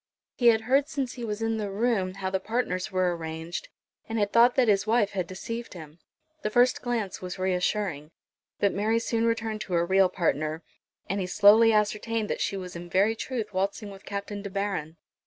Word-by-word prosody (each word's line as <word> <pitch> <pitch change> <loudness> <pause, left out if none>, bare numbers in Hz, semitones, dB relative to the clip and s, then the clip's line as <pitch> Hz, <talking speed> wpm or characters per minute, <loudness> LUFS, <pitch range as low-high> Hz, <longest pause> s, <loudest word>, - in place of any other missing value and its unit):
He 240 - +2
had 225 -1 +6
heard 270 +5 +2
since 275 -5 -3
he 245 - -7
was 215 0 -3
in 225 0 0
the 210 -2 -3
room 200 -3 0
how 190 -1 -3
the 190 - 0
partners 195 -4 -2
were 185 -2 +1
arranged, 160 +1 -6 0.4
and 225 - -2
had 205 -1 0
thought 240 +1 +6
that 255 -3 +3
his 200 0 +2
wife 220 -2 +2
had 185 -3 -2
deceived 230 +4 -6
him. 160 -1 -11 0.4
The 215 - -1
first 245 +3 +3
glance 235 -6 -2
was 185 0 -6
reassuring. 185 -4 -1 0.5
But 200 - +2
Mary 215 +3 +1
soon 230 0 0
returned 225 -2 -1
to 190 -3 -5
her 170 0 +2
real 190 +1 +4
partner; 155 -2 -1 0.4
and 195 +2 -1
he 180 - -2
slowly 210 +4 +6
ascertained 215 +1 0
that - - -2
she 200 - -1
was 180 -2 -7
in 175 0 -8
very 200 +5 +3
truth 225 -3 -4
waltzing 200 +2 -2
with 195 0 -12
Captain 200 0 -5
De 200 - -6
Baron. 195 -5 -3
205 Hz, 200 wpm, -27 LUFS, 185-225 Hz, 0.5 s, had